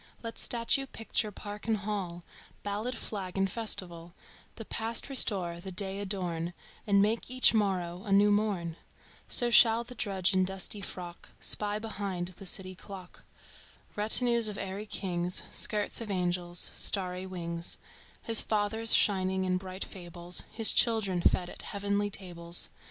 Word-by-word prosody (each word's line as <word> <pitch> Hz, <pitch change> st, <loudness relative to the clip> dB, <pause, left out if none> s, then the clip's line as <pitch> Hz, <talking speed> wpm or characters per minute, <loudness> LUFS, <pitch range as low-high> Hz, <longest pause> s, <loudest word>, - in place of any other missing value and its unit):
Let 230 Hz, 0 st, -6 dB
statue, 245 Hz, +3 st, +2 dB
picture, 225 Hz, -3 st, -1 dB
park 205 Hz, +1 st, -8 dB
and 220 Hz, -1 st, +2 dB
hall, 195 Hz, -4 st, -4 dB, 0.4 s
Ballad, 215 Hz, +5 st, -3 dB
flag 195 Hz, -5 st, -5 dB
and 195 Hz, 0 st, +2 dB
festival, 180 Hz, -5 st, -3 dB, 0.4 s
The 225 Hz, -, -8 dB
past 225 Hz, +5 st, -1 dB
restore, 185 Hz, -10 st, +1 dB
the 190 Hz, +2 st, -7 dB
day 195 Hz, +1 st, -1 dB
adorn 180 Hz, -4 st, -2 dB, 0.3 s
And 200 Hz, -1 st, +5 dB
make 225 Hz, +3 st, 0 dB
each 255 Hz, -1 st, +5 dB
morrow 185 Hz, -5 st, 0 dB
a 205 Hz, -, -5 dB
new 205 Hz, +1 st, +5 dB
morn 195 Hz, -6 st, 0 dB, 0.5 s
So 240 Hz, -2 st, +3 dB
shall 230 Hz, 0 st, +7 dB
the 240 Hz, -, -10 dB
drudge 195 Hz, -6 st, 0 dB
in 185 Hz, 0 st, +3 dB
dusty 190 Hz, +2 st, -3 dB
frock 175 Hz, -3 st, -7 dB
Spy 210 Hz, 0 st, 0 dB
behind 200 Hz, -5 st, -4 dB
the 185 Hz, +1 st, -8 dB
city 185 Hz, 0 st, -2 dB
clock 185 Hz, -1 st, -11 dB, 0.7 s
Retinues 235 Hz, +2 st, +4 dB
of 210 Hz, -1 st, -3 dB
airy 195 Hz, +2 st, -5 dB
kings, 180 Hz, -3 st, -2 dB
Skirts 210 Hz, +1 st, +2 dB
of 225 Hz, -, -5 dB
angels, 175 Hz, -2 st, -1 dB
starry 185 Hz, -1 st, 0 dB
wings, 170 Hz, -2 st, -3 dB, 0.5 s
His 225 Hz, -1 st, +4 dB
fathers 220 Hz, +1 st, +1 dB
shining 190 Hz, -1 st, +2 dB
in 185 Hz, 0 st, +1 dB
bright 185 Hz, 0 st, -5 dB
fables, 175 Hz, -1 st, -1 dB
His 225 Hz, -2 st, +6 dB
children 205 Hz, -6 st, +3 dB
fed 180 Hz, +1 st, +2 dB
at -, -, -8 dB
heavenly 200 Hz, 0 st, -1 dB
tables. 175 Hz, -3 st, -3 dB
195 Hz, 145 wpm, -30 LUFS, 180-215 Hz, 0.7 s, shall